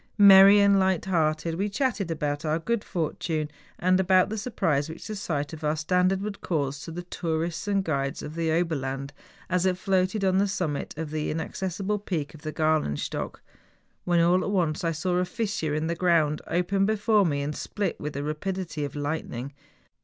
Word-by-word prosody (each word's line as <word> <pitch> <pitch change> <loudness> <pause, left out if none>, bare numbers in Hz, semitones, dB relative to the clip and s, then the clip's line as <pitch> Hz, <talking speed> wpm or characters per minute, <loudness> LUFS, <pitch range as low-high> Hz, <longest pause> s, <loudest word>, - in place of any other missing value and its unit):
Merry 200 0 +9
and 200 -1 +5
light¬ 190 -3 +2
hearted 160 -3 0
we 205 +1 0
chatted 205 -4 -1
about 150 -2 -2
our 155 0 +1
good 230 +6 -1
fortune, 155 -2 -2 0.3
and 185 +1 +3
about 185 0 +4
the 220 - -3
surprise 160 - 0
which 160 - -9
the 215 - -5
sight 155 -7 -3
of 160 - -9
our 150 +1 +1
standard 180 +4 +1
would 205 -1 -5
cause 145 -5 -1
to 165 - -7
the 175 +2 -6
tourists 170 +1 -3
and 200 -1 +1
guides 140 -3 -2
of 150 - -6
the 165 -1 -1
Ober 165 0 +1
land, 135 +1 -4 0.3
as 180 -1 +1
it 180 -1 +1
floated 190 +2 +1
on 190 0 +3
the 200 - +3
summit 170 -7 -3
of 160 -2 -4
the 155 -1 -2
inaccessible 190 +5 -2
peak 165 -8 -3
of 155 - -13
the 155 0 -4
Gralenstock, 155 - -1 0.6
when, 175 -1 +2
all 175 +2 +4
at - - -2
once, 180 -3 0
I 165 - +1
saw 175 +3 -1
a 180 - +2
fissure 195 -7 -2
in 155 +1 -1
the 165 - 0
ground 165 -4 +2
open 195 +3 +1
before 215 0 +3
me 145 -5 0
and 150 +1 -3
split 200 -4 -3
with 150 0 -4
the 140 - -3
rapidity 170 +1 -3
of 140 -1 -5
lightning. 145 -3 -4
170 Hz, 195 wpm, -26 LUFS, 155-190 Hz, 0.6 s, Merry